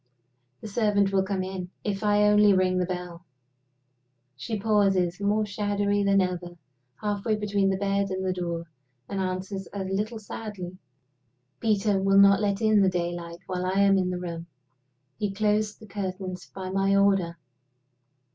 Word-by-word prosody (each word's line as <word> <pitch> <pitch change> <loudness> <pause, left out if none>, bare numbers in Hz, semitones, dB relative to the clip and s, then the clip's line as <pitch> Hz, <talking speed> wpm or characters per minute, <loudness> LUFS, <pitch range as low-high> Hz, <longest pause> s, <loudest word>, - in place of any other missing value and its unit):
The - - -7
servant 205 -2 +2
will 190 - +4
come 190 -1 -2
in, 185 -1 -5
if 200 0 -2
I 210 0 +3
only 210 -1 +6
ring 185 -1 +2
the 180 - 0
bell." 180 -1 -6 1.1
She 215 - -4
pauses 195 -4 +2
more 210 +2 +1
shadowy 205 0 0
than 195 0 +4
ever 175 -1 -3 0.4
halfway 210 +1 0
between 205 -2 0
the 190 - 0
bed 200 0 0
and 190 0 -3
the 185 - +1
door, 170 -2 -3 0.4
and 200 - -4
answers 190 +1 -3
a 200 -1 -4
little 205 +4 -2
sadly: 200 -4 -7 0.8
"Peter 205 -3 +1
will 195 0 +3
not 200 +1 +7
let 200 0 0
in 215 -1 +5
the 190 - +4
daylight 175 -1 -4
while 180 -1 -3
I 190 +2 +1
am 195 -1 +5
in 185 -1 0
the 180 - -2
room. 170 -1 -6 0.7
He 205 -2 -1
closed 210 +1 0
the 220 - -12
curtains 185 -2 -5
by 185 -1 -7
my 195 +1 +2
order." 195 -4 +2
195 Hz, 160 wpm, -26 LUFS, 185-205 Hz, 1.1 s, not